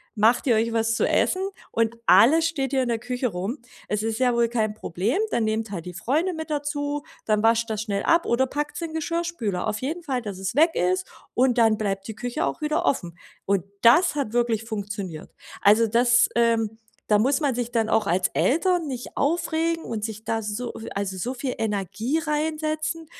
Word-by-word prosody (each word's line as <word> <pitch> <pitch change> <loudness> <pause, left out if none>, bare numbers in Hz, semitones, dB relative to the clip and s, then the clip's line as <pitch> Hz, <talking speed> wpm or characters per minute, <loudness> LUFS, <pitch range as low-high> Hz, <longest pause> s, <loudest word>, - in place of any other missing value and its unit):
macht 225 +3 +3
ihr 245 -4 +4
euch 225 +1 0
was 225 0 +1
zu - - +1
essen 370 - +2 0.3
und 230 0 0
alles 320 +7 +6
steht 280 -5 -1
hier 270 -1 +2
in 245 - -2
der 230 -1 0
Küche 250 +2 -2
rum. 195 +9 -4 0.3
Es 210 0 -1
ist 225 +1 -2
ja 250 -2 +3
wohl 235 -1 +2
kein 220 -3 0
Problem, 210 - -2
dann 230 - +1
nehmt 220 0 -2
halt 175 -4 -5
die 180 - -7
Freunde 295 - 0
mit 320 -1 -6
dazu, 290 0 -2 0.2
dann 215 -1 +2
wascht 230 0 +3
das 215 -1 -2
schnell 200 -2 -2
ab 335 +1 +3
oder 235 +3 +2
packt's 295 +5 -4
in 330 -1 -4
Geschirrspüler. 320 - -2
Auf 215 0 -2
jeden 320 +7 -3
Fall, 265 -6 -2
dass 205 -5 -6
es 190 +4 -3
weg 320 +4 +5
ist 185 +1 0 0.3
und 250 0 +2
dann 225 -2 +4
bleibt 195 -2 -2
die 220 - -5
Küche 245 +6 -2
auch - - -3
wieder 305 +3 0
offen.“ 175 -9 -1 0.3
Und 195 -3 +1 0.2
das 300 +9 +6
hat 275 -7 -2
wirklich 235 -2 +1
funktioniert. 200 -6 -5 0.3
Also, 215 +3 +5
das, 235 +2 +4
ähm 230 -2 +2 0.3
da 210 -1 +4
muss 270 +8 +2
man 280 -4 +1
sich 240 -1 -3
dann 225 -2 +1
auch 215 -2 +2
als 180 +2 +2
Eltern 340 +3 +1
nicht 250 -3 -6
aufregen 330 +2 0
und 225 -2 -4
sich 220 -1 -5
da 225 0 -1
so 220 +3 -4 0.2
also, 195 -1 -2
so 240 +8 -3
viel 255 0 -4
Energie 220 - -1
reinsetzen. 310 +1 -2
235 Hz, 200 wpm, -24 LUFS, 215-290 Hz, 0.3 s, alles